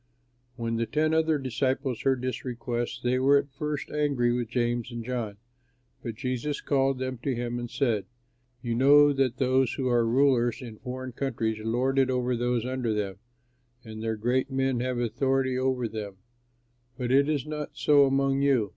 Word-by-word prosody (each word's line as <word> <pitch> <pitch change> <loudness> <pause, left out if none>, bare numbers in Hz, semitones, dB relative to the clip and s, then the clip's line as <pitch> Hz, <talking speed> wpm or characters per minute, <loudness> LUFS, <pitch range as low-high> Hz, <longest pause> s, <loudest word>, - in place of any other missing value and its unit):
When 115 -2 -2
the 115 0 -1
ten 155 +1 +1
other 160 -1 +3
disciples 130 -1 -1
heard 130 -2 +1
this 130 0 -3
request, 120 -1 -3
they 125 +1 +1
were 140 +2 +5
at 140 0 -2
first 150 +1 -4
angry 140 -5 +1
with 120 -2 -2
James 120 -1 -1
and 120 -1 -6
John, 115 -5 -3 0.6
but 115 -2 -5
Jesus 130 +5 -3
called 135 -1 +1
them 130 -1 -4
to 130 +1 -2
him 120 0 -3
and 120 -1 -5
said, 115 -8 0 0.6
"You 120 -2 -1
know 145 +4 +6
that 135 -2 0
those 130 -1 +2
who 130 -2 -1
are 120 -1 +3
rulers 120 -1 +3
in 115 -4 -9
foreign 130 0 -6
countries 115 -4 -2
lord 125 +4 +1
it 130 -1 +3
over 125 -1 0
those 120 0 0
under 125 -4 -1
them, 100 -2 -3 0.7
and 110 -2 -8
their 110 0 -1
great 125 +5 0
men 135 -2 0
have 125 0 -1
authority 130 +2 0
over 130 -2 0
them; 105 -3 -6 0.8
but 125 -2 -2
it 140 +2 +4
is 145 -4 0
not 150 -1 -4
so 145 -2 +5
among 135 0 +1
you. 130 -7 +2
130 Hz, 180 wpm, -27 LUFS, 120-135 Hz, 0.8 s, know